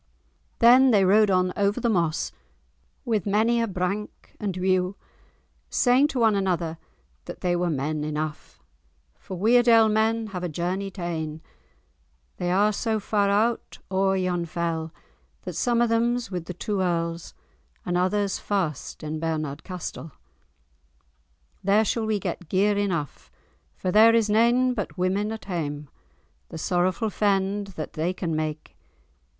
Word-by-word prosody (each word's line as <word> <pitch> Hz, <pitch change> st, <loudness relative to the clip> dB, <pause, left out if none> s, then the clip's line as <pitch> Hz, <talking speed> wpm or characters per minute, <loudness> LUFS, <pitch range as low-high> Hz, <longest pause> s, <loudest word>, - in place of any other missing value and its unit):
Then 250 Hz, +3 st, +7 dB
they 205 Hz, -5 st, +4 dB
rode 210 Hz, +2 st, +5 dB
on 185 Hz, -1 st, +2 dB
over 205 Hz, +3 st, +1 dB
the 240 Hz, -, 0 dB
moss, 170 Hz, -8 st, 0 dB, 0.7 s
"with 215 Hz, -5 st, 0 dB
many 225 Hz, +4 st, +2 dB
a 230 Hz, -, 0 dB
brank 195 Hz, +2 st, -4 dB
and 195 Hz, -3 st, -3 dB
whew," 185 Hz, +1 st, +1 dB, 0.7 s
saying 255 Hz, +3 st, +4 dB
to 275 Hz, -4 st, -3 dB
one 225 Hz, -2 st, +4 dB
another 175 Hz, -5 st, -1 dB, 0.5 s
that -, -, -9 dB
they 175 Hz, -1 st, +1 dB
were 175 Hz, 0 st, 0 dB
men 150 Hz, +1 st, -2 dB
enough, 150 Hz, -, -5 dB, 0.6 s
"For 185 Hz, -, -8 dB
Weardale 230 Hz, +2 st, +5 dB
men 220 Hz, +1 st, +1 dB
have 180 Hz, -1 st, -4 dB
a 180 Hz, -, -2 dB
journey 180 Hz, +5 st, -2 dB
ta'en, 165 Hz, -5 st, -4 dB, 1.0 s
They 175 Hz, -, -2 dB
are 205 Hz, +4 st, +3 dB
so 220 Hz, +1 st, -1 dB
far 205 Hz, -1 st, +1 dB
out 220 Hz, +4 st, 0 dB
o'er 190 Hz, 0 st, +2 dB
yon 180 Hz, -2 st, -1 dB
fell, 165 Hz, -1 st, -3 dB, 0.5 s
That -, -, -5 dB
some 240 Hz, -1 st, +1 dB
of 235 Hz, -, +1 dB
them's 235 Hz, 0 st, 0 dB
with 180 Hz, -3 st, -4 dB
the 180 Hz, -, -7 dB
two 205 Hz, +1 st, -2 dB
earls, 170 Hz, -2 st, -2 dB, 0.5 s
And 175 Hz, -, -1 dB
others 195 Hz, +2 st, 0 dB
fast 175 Hz, -10 st, -3 dB
in 155 Hz, +1 st, -4 dB
Bernard 155 Hz, -3 st, -3 dB
castell. 175 Hz, -4 st, -7 dB, 1.5 s
There 200 Hz, +3 st, +4 dB
we -, -, +2 dB
shall 220 Hz, 0 st, -1 dB
get 180 Hz, -3 st, -5 dB
gear 205 Hz, +2 st, +2 dB
enough, 180 Hz, -8 st, -3 dB, 0.5 s
For 185 Hz, -, -2 dB
there 225 Hz, +3 st, +6 dB
is 220 Hz, -2 st, +2 dB
nane 240 Hz, +4 st, +3 dB
but 205 Hz, -5 st, -5 dB
women 195 Hz, +4 st, 0 dB
at 225 Hz, -, -7 dB
hame; 150 Hz, -6 st, -4 dB, 0.6 s
The -, -, -7 dB
sorrowful 185 Hz, +6 st, 0 dB
fend 200 Hz, 0 st, 0 dB
that 155 Hz, -, -5 dB
they 165 Hz, +4 st, -1 dB
can 170 Hz, -3 st, -3 dB
make. 155 Hz, 0 st, -4 dB
190 Hz, 145 wpm, -25 LUFS, 170-215 Hz, 1.5 s, Then